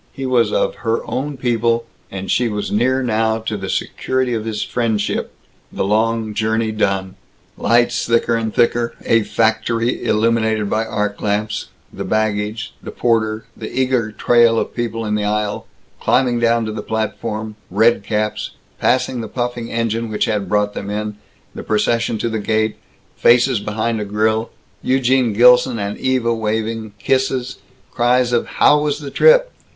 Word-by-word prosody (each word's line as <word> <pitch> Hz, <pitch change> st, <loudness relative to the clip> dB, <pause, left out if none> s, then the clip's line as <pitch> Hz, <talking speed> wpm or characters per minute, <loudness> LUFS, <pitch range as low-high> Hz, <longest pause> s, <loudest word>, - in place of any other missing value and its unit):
He 135 Hz, -, -6 dB
was 120 Hz, -4 st, +2 dB
of -, -, +1 dB
Her 115 Hz, -1 st, -1 dB
Own 140 Hz, +1 st, -3 dB
People, 115 Hz, -2 st, +1 dB, 0.2 s
and 95 Hz, 0 st, -5 dB
she 125 Hz, -, +2 dB
was 105 Hz, -1 st, -3 dB
near 130 Hz, +5 st, +1 dB
now 110 Hz, -1 st, +1 dB
to 110 Hz, -1 st, -4 dB
the 95 Hz, -2 st, -5 dB
security 130 Hz, -1 st, -1 dB
of 110 Hz, -1 st, -2 dB
his 110 Hz, -2 st, -2 dB
friendship, 110 Hz, -4 st, -1 dB, 0.4 s
the -, -, -2 dB
long 110 Hz, +1 st, 0 dB
journey 110 Hz, +1 st, 0 dB
done. 95 Hz, -3 st, -1 dB, 0.4 s
Lights 120 Hz, +2 st, +2 dB
thicker 115 Hz, 0 st, +2 dB
and 115 Hz, -1 st, -1 dB
thicker 120 Hz, +1 st, +1 dB
a 115 Hz, -, +4 dB
factory 115 Hz, +2 st, 0 dB
illuminated 110 Hz, -1 st, +1 dB
by 110 Hz, +1 st, 0 dB
arc 105 Hz, -2 st, -2 dB
lamps, 105 Hz, +1 st, -1 dB, 0.3 s
the -, -, -5 dB
baggage 110 Hz, 0 st, -1 dB
the -, -, -8 dB
porter 110 Hz, -2 st, 0 dB
the 110 Hz, -, -7 dB
eager 125 Hz, -4 st, 0 dB
trail 120 Hz, +1 st, +3 dB
of -, -, -2 dB
people 115 Hz, -2 st, -3 dB
in 105 Hz, -, -1 dB
the 105 Hz, 0 st, 0 dB
aisle 105 Hz, 0 st, -2 dB, 0.3 s
climbing 125 Hz, -2 st, +2 dB
down 115 Hz, -1 st, +2 dB
to 110 Hz, -, -3 dB
the 110 Hz, -, -5 dB
platform 110 Hz, 0 st, -3 dB
red 110 Hz, +5 st, +3 dB
caps 105 Hz, 0 st, -2 dB, 0.2 s
passing 125 Hz, -1 st, +1 dB
the 110 Hz, -, -5 dB
puffing 120 Hz, 0 st, -3 dB
engine 115 Hz, 0 st, -1 dB
which 105 Hz, -1 st, 0 dB
had 105 Hz, -4 st, -2 dB
brought 105 Hz, 0 st, +1 dB
them 100 Hz, -, -5 dB
in 105 Hz, 0 st, -3 dB, 0.4 s
the -, -, -7 dB
procession 115 Hz, +2 st, 0 dB
to 110 Hz, -, -2 dB
the 110 Hz, -1 st, -2 dB
gate 110 Hz, +1 st, 0 dB, 0.4 s
faces 125 Hz, 0 st, +4 dB
behind 110 Hz, +2 st, -2 dB
a -, -, -3 dB
grill 110 Hz, +2 st, 0 dB, 0.3 s
Eugene 130 Hz, -2 st, +2 dB
Gilson 125 Hz, +2 st, +5 dB
and 100 Hz, -1 st, -3 dB
Eva 125 Hz, -3 st, +1 dB
waving 110 Hz, -1 st, -3 dB
kisses, 130 Hz, +2 st, -1 dB, 0.3 s
cries 125 Hz, 0 st, +2 dB
of 120 Hz, -, +1 dB
"How 150 Hz, 0 st, +5 dB
was 150 Hz, -1 st, 0 dB
the 145 Hz, -2 st, -8 dB
trip?" -, -, +5 dB
115 Hz, 160 wpm, -19 LUFS, 105-120 Hz, 0.4 s, Gilson